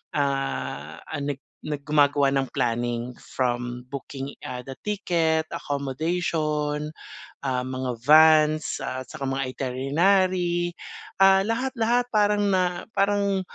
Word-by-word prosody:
ah, 85 - -2 0.2
nag 140 -1 -3 0.2
nag 145 -2 -5
gumagawa 145 -2 +3
ng 135 -1 0
planning 120 -1 -1
from 125 -1 -2
booking, 140 +1 -6
ah, 125 -1 -6
the 135 - -6
ticket, 165 -6 0
accommodation, 150 +1 -1 0.5
ah, 130 -2 -1
mga 130 -1 -3
vans 155 0 +6
at 130 -1 -5
tsaka 150 -3 -6
mga 135 0 -1
iterinary, 175 +6 +1 0.4
ah, 195 0 +6
lahat-lahat, 240 +2 +1
parang 210 -1 +3
na 180 -1 0
parang, 200 -1 +1
150 Hz, 105 wpm, -25 LUFS, 130-180 Hz, 0.5 s, vans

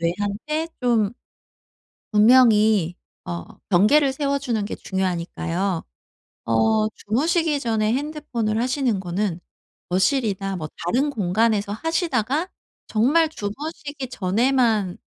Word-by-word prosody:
뇌한테 205 - -2
좀 230 -4 +2 1.0
분명히 215 -5 +5 0.3
어 85 -1 -4 0.3
경계를 265 +10 +4
세워주는 275 -6 -1
게 - - -5
중요하니까요. 180 -1 -2 0.6
어 215 - +2
주무시기 300 - 0
전에 220 -3 0
핸드폰을 250 -7 -2
하시는 250 -5 0
거는 180 0 -2 0.5
거실이나 195 -1 0
뭐 155 -2 -5 0.2
다른 265 +11 +1
공간에서 210 -1 +1
하시다가 320 - -1 0.4
정말 295 +9 +3
주무시기 285 +3 -6
전에만 220 -1 +1
220 Hz, 245 characters per minute, -23 LUFS, 195-275 Hz, 1.0 s, 분명히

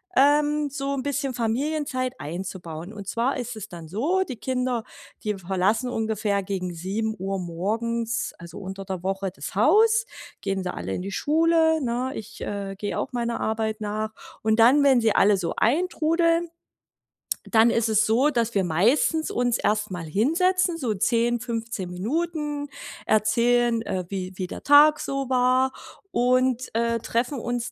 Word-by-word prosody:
ähm, 295 +1 +3
so 275 0 -3
'n 265 -2 -3
bisschen 280 -1 -2
Familienzeit 255 +2 -1
einzubauen. 175 0 -6
Und 200 -3 -9
zwar 235 +6 0
ist 245 -2 -5
es 215 - -8
dann 170 -2 -9
so: 300 - +1
Die 260 - -5
Kinder, 250 0 -1 0.4
die 210 -1 -1
verlassen 195 +7 0
ungefähr 215 -3 -1
gegen 185 -2 -3
7:00 195 +2 -3
morgens 225 +7 -2
also 170 +2 -10
unter 195 0 -6
der 185 -2 -5
Woche 195 0 -2
das 190 - -8
Haus, 435 - +4 0.4
gehen 195 -1 -2
sie 180 - -3
alle - - -4
in - - -4
die 195 +2 -5
Schule, 320 +4 +3
ne? 250 +1 -1
Ich, 215 -1 -9
äh, 200 -1 -4
gehe 205 +1 -3
auch 270 - -4
meiner 235 -1 -2
Arbeit 220 0 -1
nach. 215 +1 -3 0.3
Und 220 +1 +1
dann, 255 +6 +6
wenn 270 -3 +5
sie 220 -2 +3
alle 205 0 +4
so 175 -3 -2
eintrudeln, 335 +4 +2 1.0
dann 225 0 +6
ist 230 -1 +1
es 220 0 +3
so, 255 +7 +3
dass 235 -3 -1
wir 195 - +3
meistens 235 - +2
uns 245 -1 0
erst 210 0 0
mal 175 -2 -4
hinsetzen, 335 - +2
so 230 -7 -1
10, 235 +4 +1
15 225 -5 -4
Minuten, 295 - -2 0.4
erzählen, 235 +2 +2
äh, 190 -3 -2
wie 190 -1 -4
wie 185 -1 -4
der - - -8
Tag 295 +1 +7
so 275 -1 -3
war 255 +1 +3 0.4
und, 255 -2 +1
äh, 230 +1 +1
treffen 240 +5 -1
uns 240 +1 -3
230 Hz, 160 wpm, -25 LUFS, 200-270 Hz, 1.0 s, Tag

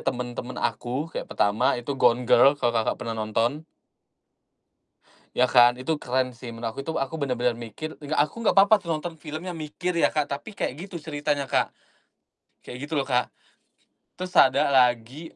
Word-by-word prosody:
temen-temen 125 -1 -5
aku, 135 +7 -2
kayak - - -5
pertama 100 +5 +1
itu 120 +4 -4
Gone 125 +1 +4
Girl 135 +4 +5
kalau 120 -4 0
Kakak 115 -1 0
pernah 115 -2 -5
nonton. 115 +7 -1 1.7
Ya 125 - +5
kan? 120 -1 +5
Itu 150 +4 -2
keren 130 0 -1
sih 120 +1 -9
menurut 115 0 -4
aku, 135 - -8
itu 160 - -4
aku 135 +4 -2
bener-bener 125 -3 0
mikir 120 +7 -7
enggak 150 +2 -3
aku 150 - -16
enggak 220 - +1
papa 200 +1 +6
tuh 170 - -9
nonton 170 +2 -6
film 155 0 -7
yang 180 - -4
mikir 160 +4 -3
ya, 170 - +3
Kak, 150 -2 0
tapi 145 +10 -7
kayak - - -1 0.2
gitu 175 - -6
ceritanya, 145 -2 -2
Kak. - - +1 1.0
Kayak 125 - -7
gitu 150 +1 -2
loh, 135 - -1
Kak, 125 -2 +1 0.9
terus 185 0 -6
ada 130 - +5
lagi 125 +4 +1
135 Hz, 175 wpm, -25 LUFS, 120-155 Hz, 1.7 s, papa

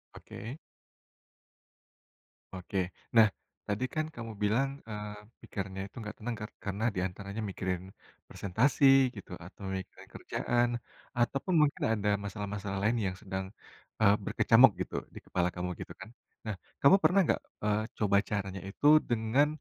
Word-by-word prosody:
Oke. 120 +7 -8 1.9
Oke. 95 +1 -5 0.4
Nah, 110 -1 +9 0.4
tadi 105 +4 -1
kan 155 0 0
kamu 115 -1 -6
bilang, 115 +7 +2 0.2
eee, 105 -1 -5 0.3
pikirannya 95 -1 -5
itu - - -27
nggak 105 -1 -6
tenang 115 +2 -3
kar 105 - -5 0.2
karena 100 +2 -2
di - - 0
antaranya 100 +3 -6
mikirin 95 -2 -2 0.5
presentasi 110 +10 0 0.3
gitu, 100 - -10
atau 95 +3 -12
mikirin 95 - -9
kerjaan, 120 0 0 0.5
ataupun 135 +9 +1
mungkin 150 -1 +2
ada 105 -1 0
masalah-masalah 100 0 -4
lain 115 +3 +3
yang 90 - -3
sedang, 95 -2 -3 0.6
eee, 100 -1 +6
berkecamuk 120 +2 +6
gitu - - -4 0.2
di - - -6
kepala 90 -1 +1
kamu 90 0 -2
gitu, - - -7
kan. - - -8 0.4
Nah, 110 -2 -2 0.3
kamu 140 +7 +8
pernah 195 - +5
nggak, - - +1 0.2
eee, 105 0 +2 0.2
coba 100 -2 +3
caranya 95 -3 -2
itu 105 - -6 0.2
dengan 120 +5 +3
105 Hz, 140 wpm, -31 LUFS, 95-115 Hz, 1.9 s, Nah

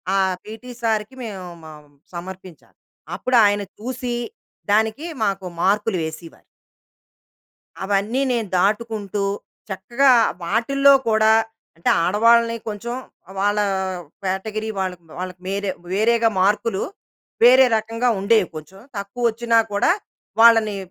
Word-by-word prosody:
ఆ - - +3 0.3
పీటీ 225 +3 -10
సార్‌కి 220 +2 -1
మేము 195 -5 -7 0.2
మ 160 - -10 0.5
సమర్పించాలి. 185 -1 -10 0.4
అప్పుడు 255 -1 +1
ఆయన 205 0 +2 0.2
చూసి, 245 +1 -4 0.6
దానికి 220 +8 +1 0.2
మాకు 195 -2 -1 0.2
మార్క్‌లు 205 +1 +1
వేసేవారు. 160 +1 -8 1.4
అవన్నీ 205 +6 0
నేను 230 -4 -1
దాటుకుంటూ, 205 0 -1 0.5
చక్కగా 240 +8 +2 0.3
వాటిల్లో 275 +9 +3 0.2
కూడా 220 0 +4 0.4
అంటే, 165 - 0
ఆడవాళ్ళని 230 +5 +4
కొంచెం 225 +3 -5 0.4
వాళ్ళ 205 +1 +1 0.7
కేటగరీ 215 +3 -3
వాళ్ళకి, 185 -2 -3 0.2
వాళ్ళకి 185 0 -6
వేరే 200 0 -2 0.2
వేరేగా 230 +3 +3
మార్కులు, 205 +1 +1 0.6
వేరే 255 +2 +8
రకంగా 225 +3 -1
ఉండేవి. 200 -1 +3
కొంచెం 170 +5 -10 0.2
తక్కువొచ్చినా 230 +2 0
కూడా, 205 +11 +2 0.5
వాళ్ళని 225 -3 +6
215 Hz, 105 wpm, -21 LUFS, 195-230 Hz, 1.4 s, వేరే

